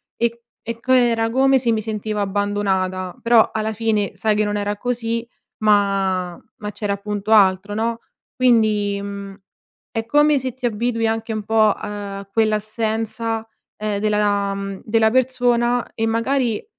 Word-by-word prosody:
e 235 0 -1 0.2
e 230 0 -6
c 255 - -14
era 235 -3 +3
come 265 +2 +4
se 240 -2 +1
mi 220 -1 0
sentivo 215 -1 -3
abbandonata. 195 -2 -1
Però, 230 -1 +5
alla 220 0 -1
fine 215 -2 0
sai 210 +2 +1
che, 215 - +2
non 205 0 -1
era 205 0 -1
così, 230 -1 -2 0.4
ma 195 -4 +2 0.2
ma 210 -1 -5
c'era 205 -1 -2
appunto 205 +1 -4
altro, 200 -1 +4
no, 230 +1 -1 0.4
quindi, 215 -5 +3
mhmm, 200 -1 -7 0.6
è 225 0 -3
come 295 +3 +4
se 260 -1 -4
ti 255 0 -6
abitui 230 0 0
anche 225 0 -2
un 215 -1 -3
po', 215 -1 +3
uhm, - - -6
a 200 -1 -6
quell'assenza, 220 +1 -1 0.3
ehm, 210 -1 -2
della 205 -1 +1 0.3
della 220 0 +2
persona, 245 -1 +1
e 225 - -1
magari, 230 0 0
220 Hz, 150 wpm, -21 LUFS, 205-230 Hz, 0.6 s, Però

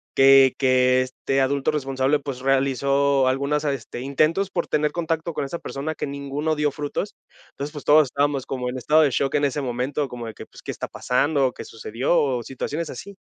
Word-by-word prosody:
que 135 -1 +7
que 130 -1 +3
este 130 +1 -2
adulto 135 +1 +1
responsable, 135 -1 0
pues 135 -3 -6
realizó 135 0 +2
algunas 140 +3 0
a 145 - +1
este, 120 -2 -7
intentos 155 +8 +1
por 175 -3 -2
tener 150 0 +1
contacto 165 0 -2
con 145 - -2
esa 170 +5 -5
persona 155 +3 -5
que - - -4
ninguno 140 +2 -2
dio 150 -1 +1
frutos. 150 +8 -4 0.4
Entonces 140 +2 -6
pues 145 -2 -9
todos 150 +1 +6
estábamos 140 0 0
como 125 -2 -3
en 125 - -4
estado 150 +5 +3
de 145 - +2
shock 135 +2 0
en 145 - +3
ese 140 +1 -1
momento, 130 +3 -2
como 120 -1 -7
de 110 - -7
que - - -10 0.2
qué - - -3
está - - -5
pasando 140 +2 +1
o 125 - -5
qué - - -8
sucedió 115 +8 -1
o 130 -4 0
situaciones 150 +6 -4
así. 200 +6 -9
140 Hz, 205 wpm, -23 LUFS, 130-150 Hz, 0.4 s, que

